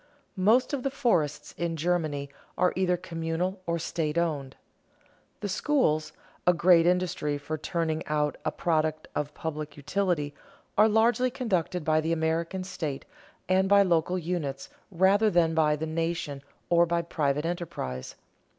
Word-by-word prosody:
Most 235 +8 +4
of 280 - -1
the 275 - 0
forests 230 - 0
in 170 -1 -1
Germany 155 -4 -1 0.3
are 180 - +3
either 180 -1 +1
communal 175 +2 -3
or 170 0 0
state 160 -1 -2
owned. 145 -6 -1 0.9
The 205 - -2
schools, 190 - +1 0.4
a 180 - +6
great 170 -1 +5
industry 175 -5 0
for 145 +2 -4
turning 160 0 -2
out 150 -1 0
a - - 0
product 155 -2 0
of 150 0 -3
public 155 -2 -5
utility, 155 -2 -1 0.4
are 215 +2 +6
largely 235 +4 +3
conducted 185 - -1
by 155 0 +3
the 165 +1 0
American 165 +3 -1
state 160 -7 -5 0.4
and 190 +1 +3
by 200 0 +7
local 180 0 +1
units 155 -6 -3 0.2
rather 195 +4 +4
than 170 -3 +3
by 155 -2 +3
the 155 +2 -3
nation 160 -3 -2 0.3
or 170 0 +5
by 170 0 0
private 150 -2 -1
enterprise. 165 - -4
170 Hz, 145 wpm, -28 LUFS, 155-185 Hz, 0.9 s, by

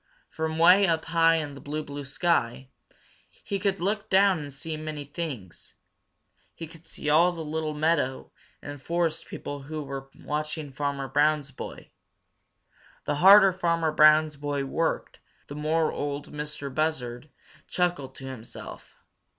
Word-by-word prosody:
From 160 0 -3
way 180 +4 +6
up 165 -2 0
high 165 0 +4
in 150 -3 -2
the 140 - -11
blue, 155 +2 -4
blue 145 -1 -7
sky 135 -4 0 0.7
he 200 - -2
could 200 -2 0
look 205 +4 -2
down 190 -2 +4
and 145 -1 -7
see 155 +4 -5
many 155 -1 -6
things. 140 - -7 0.8
He 165 - -6
could 165 +1 -15
see - - -6
all 165 +4 +5
the 165 -2 -6
little 155 0 -3
meadow 150 -4 0 0.3
and 145 -1 -8
forest 165 +1 -1
people 145 0 -6
who 150 +2 -5
were 135 -1 -7
watching 150 0 -4
Farmer 140 0 -3
Brown's 145 +1 +2
boy. 130 - -9 1.1
The 145 - -1
harder 195 0 +8
Farmer 170 -3 +1
Brown's 155 0 +5
boy 145 -1 -2
worked, 165 +4 -2 0.3
the 145 - -9
more 155 +2 +1
Ol' 145 0 -3
Mistah 150 -1 -5
Buzzard 145 -4 -2 0.4
chuckled 175 -7 -1
to 135 - -8
himself. 125 -4 -9
155 Hz, 145 wpm, -27 LUFS, 145-165 Hz, 1.1 s, harder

